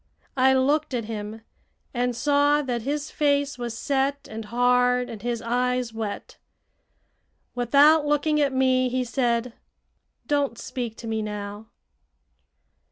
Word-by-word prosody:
I 265 0 +4
looked 285 +2 +1
at 230 -2 -2
him 215 0 -6 0.5
and 245 -1 -1
saw 290 +3 +2
that 245 -3 -2
his 285 +4 -3
face 285 -2 0
was 235 -2 -4
set 275 +2 -1
and 220 0 -7
hard 250 +2 +2
and 220 -3 -8
his 240 -1 -3
eyes 250 0 0
wet. 220 -2 -6 1.1
Without 290 +5 +4
looking 300 +1 +2
at 280 -1 +2
me, 260 -1 +2
he 255 +1 -1
said: 240 -1 -1 0.7
"Don't 285 -5 0
speak 235 -3 -5
to 230 - -8
me 220 -1 -1
now." 210 0 -6
250 Hz, 130 wpm, -25 LUFS, 230-280 Hz, 1.1 s, I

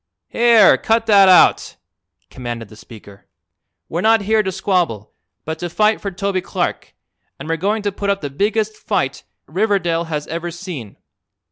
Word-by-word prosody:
"Here, 230 -3 +5
cut 225 0 +1
that 200 -3 +6
out!" 180 - +4 0.6
commanded 120 -4 -7
the 110 - -14
speaker. 105 -2 -15 0.6
"We're 170 - -3
not 225 +1 +4
here 215 +2 +2
to 190 -2 -3
squabble, 180 - -2 0.3
but 160 0 -5
to 175 - -4
fight 215 +5 +1
for 200 - -3
Toby 195 0 -2
Clark, - - -4 0.4
and - - -9
we're 165 0 -1
going 205 +5 -1
to 205 - -1
put 200 +1 -4
up 200 0 0
the 145 -2 -5
biggest 215 +6 -1
fight - - -2 0.2
Riverdale 175 -6 0
has 150 -2 -4
ever 170 +1 -5
seen. 170 - -8
185 Hz, 160 wpm, -18 LUFS, 160-210 Hz, 0.6 s, that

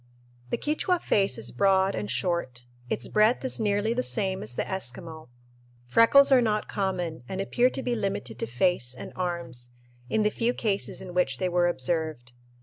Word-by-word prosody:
The - - 0
Quichua 325 +4 0
face 195 - +1
is 115 +1 -5
broad 190 +8 +3
and 105 -1 -4
short. 125 -2 -2 0.2
Its 120 - -3
breadth 215 +5 +3
is 260 - -2
nearly 210 +1 +1
the 250 - 0
same 195 -6 -1
as 110 +3 -4
the - - 0
Eskimo. 160 -3 -5 0.6
Freckles 230 - +6
are 260 -2 +7
not 215 -2 0
common 180 -7 -2
and 190 - -4
appear 240 +6 +2
to 265 - -4
be 245 - 0
limited 195 - -3
to - - -2
face 125 0 +1
and - - -9
arms, 170 -10 -3 0.4
in 215 - +1
the 210 - +2
few 235 +3 0
cases 200 -3 -1
in 185 -2 -8
which 175 -8 +1
they 185 - -1
were 175 0 +2
observed. 155 -5 -2
185 Hz, 180 wpm, -27 LUFS, 130-215 Hz, 0.6 s, are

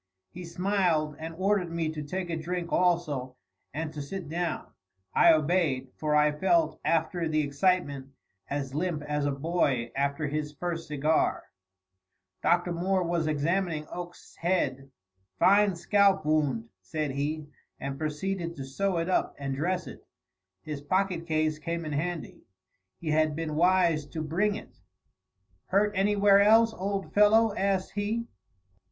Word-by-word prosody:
He 180 0 -8
smiled 170 -4 0
and 160 +1 -6
ordered 190 -1 +1
me 165 -1 -2
to 155 -1 -5
take 175 +4 -4
a - - -1
drink 170 +2 -4
also, 155 -8 +1 0.4
and 155 +2 -4
to 150 - -5
sit 175 +4 -6
down. 175 +1 -3 0.4
I 170 - +7
obeyed, 155 -5 +1
for 150 -1 0
I 150 0 +4
felt, 160 0 +1
after 165 +1 0
the 155 0 +2
excitement, 145 -2 0 0.4
as 140 -2 -3
limp 155 0 -2
as 150 -1 -1
a - - +1
boy 140 -5 0
after 140 +2 0
his 150 0 -3
first 165 +1 -4
cigar. 150 +1 +1 1.0
Dr. 175 0 +2
Moore 185 +2 +1
was 170 -2 0
examining 155 +1 0
Oakes's 175 0 -9
head. 140 -7 -1 0.5
"Fine 200 0 +4
scalp 195 -1 +3
wound," 145 -7 +1
said 150 +10 -3
he, 150 +3 -2 0.3
and 135 0 -5
proceeded 170 +3 -3
to 135 - -6
sew 185 +7 -1
it 165 +1 -1
up 185 - 0
and 140 -1 -3
dress 180 +5 -1
it. - - -10 0.6
His 150 -2 -5
pocket 185 +1 0
case 155 -1 0
came 165 +1 -3
in 155 - -4
handy. 165 +3 -3 0.6
He 160 -2 -3
had 155 -1 +2
been 160 -1 -3
wise 170 -2 +3
to 160 0 -5
bring 195 +7 0
it. 215 - -11 0.9
"Hurt 205 +2 +2
anywhere 200 0 +4
else, 225 +2 +5
old 195 0 -3
fellow?" 215 +1 +5
asked 195 -1 0
he. 215 +3 -2
165 Hz, 145 wpm, -28 LUFS, 150-185 Hz, 1.0 s, I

